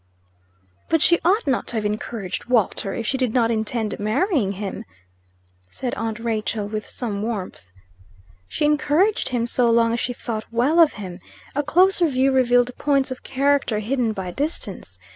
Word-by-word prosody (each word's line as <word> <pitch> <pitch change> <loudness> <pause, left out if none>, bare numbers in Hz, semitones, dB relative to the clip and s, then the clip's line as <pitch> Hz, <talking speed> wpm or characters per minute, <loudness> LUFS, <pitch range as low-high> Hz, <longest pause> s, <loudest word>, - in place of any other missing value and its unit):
"But 325 -2 +3
she 340 - +4
ought 385 +5 +2
not 265 -4 0
to - - -2
have 215 -1 -1
encouraged 210 -2 -4
Walter, 225 -5 +1
if 230 - -4
she 265 +4 -1
did 255 -3 0
not 230 -2 +3
intend 220 -1 -2
marrying 220 - +1
him," 200 0 -5 0.9
said 250 - -4
aunt 225 0 -3
Rachel, 220 -2 -2
with 215 0 -5
some 210 -5 -3
warmth. 200 - -5 0.8
"She 300 - -1
encouraged 300 +7 +2
him 240 -2 0
so 240 0 +3
long 230 0 +3
as 235 - -1
she 245 - -2
thought 225 -2 -5
well 255 +9 +2
of 325 -3 +6
him. 185 -4 -8 0.3
A 290 - +1
closer 355 +4 +4
view 270 -1 +2
revealed 245 -1 +3
points 275 -2 +1
of 255 - -6
character 275 -4 +1
hidden 230 +2 0
by 190 -4 -5
distance. 205 - -4
240 Hz, 165 wpm, -22 LUFS, 215-275 Hz, 0.9 s, of